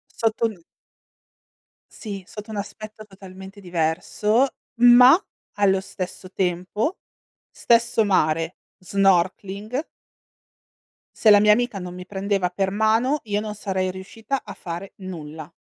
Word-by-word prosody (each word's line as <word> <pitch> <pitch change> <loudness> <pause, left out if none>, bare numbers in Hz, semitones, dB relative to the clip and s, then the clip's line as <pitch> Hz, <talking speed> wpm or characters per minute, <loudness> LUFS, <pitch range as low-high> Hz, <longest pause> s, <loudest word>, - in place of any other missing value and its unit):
Sotto 225 0 +1
n 205 -6 -10 1.3
Sì, 200 -4 -7
sotto 215 0 -9
un 210 - -5
aspetto 215 +1 -7
totalmente 195 0 -12
diverso, 180 +7 +1 0.4
ma 245 +1 +9 0.4
allo 195 -2 +2
stesso 185 0 -7
tempo, 185 - -2 0.5
stesso 230 -1 +2
mare, 165 -3 +1 0.2
snorkeling 195 - 0 1.3
se 220 - +4
la 205 - +8
mia 210 +1 +5
amica 240 -3 -1
non 180 0 -7
mi 180 - -8
prendeva 195 -1 -1
per 190 +1 -1
mano, 225 +7 +2
io 205 -1 -1
non 215 -1 -5
sarei 190 -2 -2
riuscita 220 +7 -5
a - - -9
fare 175 +3 -7
nulla. 160 -4 -8
195 Hz, 120 wpm, -23 LUFS, 185-215 Hz, 1.3 s, ma